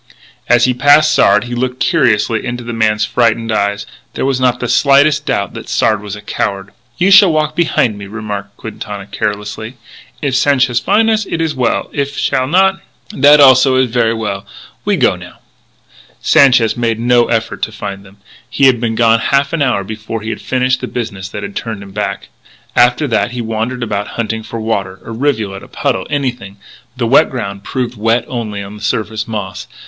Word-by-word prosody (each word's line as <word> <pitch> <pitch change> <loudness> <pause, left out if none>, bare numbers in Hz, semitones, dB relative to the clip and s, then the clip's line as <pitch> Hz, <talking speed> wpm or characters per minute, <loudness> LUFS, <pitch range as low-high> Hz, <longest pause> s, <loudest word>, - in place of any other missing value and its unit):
As 120 0 +5
he 125 - +2
passed 145 +4 +4
Sard 100 +1 +4
he 120 0 -7
looked 125 +1 -2
curiously 115 - +1
into 120 0 -4
the 120 0 -6
man's 110 -1 +1
frightened 115 -1 0
eyes. 100 -1 -1 0.3
There - - -2
was 135 -1 0
not 125 -1 +1
the 125 - -3
slightest 145 +3 +3
doubt 115 -7 -1
that - - -9
Sard 110 -2 +1
was 105 -1 -6
a 105 - -11
coward. 100 -1 -3 0.3
"You 190 +7 +2
shall 190 -2 +8
walk 155 -1 0
behin' 125 -10 +1
me," 100 - -8
remarked 100 -1 -6
Quintana 105 -2 -7
carelessly. 105 +3 -4 0.4
"If 140 -3 -1
Sanchez 130 -3 +2
fin' 215 - +2
us, 220 -2 +1
it 165 - -3
is 160 -2 -1
well; 125 -4 -1
if 140 -1 -2
he - - -4
shall 130 -2 0
not, 190 +5 +2 0.3
that 150 -7 +5
also 130 -1 +6
is 130 -2 +2
ver' 115 -1 +1
well.... 105 -3 -4 0.4
We - - +1
go, - - +2
now." - - -12 0.8
Sanchez 125 -5 +4
made 115 -2 -1
no 120 0 +3
effort 115 -1 -2
to - - -2
find 100 -2 -7
them. 100 0 -18 0.4
They - - +1
had 125 -3 +4
been 115 -2 -1
gone 115 0 +3
half 140 +4 +1
an 165 - -1
hour 125 -8 +1
before 110 +2 -6
he 110 - -3
had 110 - -6
finished 130 0 0
the - - -4
business 100 -6 -5
that 105 0 -7
had 100 0 -7
turned 110 -3 -5
him 100 - -12
back. 105 +1 -4 0.5
After 125 +5 +3
that 115 +1 0
he 125 - -3
wandered 115 +2 -3
about 105 -2 -3
hunting 110 -1 -2
for 115 +1 -7
water 100 -4 -3
a - - -8
rivulet, 110 -6 -2
a - - -13
puddle, 95 - -2
anything. 125 -9 -3 0.4
But - - -29
the 120 - -1
wet 130 - +5
ground 100 -6 -5
proved 125 +1 -3
wet 115 +3 +1
only 110 -5 -4
on 100 +1 -10
the 105 - -12
surface 110 +1 -2
moss. 105 -4 -5
115 Hz, 200 wpm, -15 LUFS, 105-130 Hz, 0.8 s, shall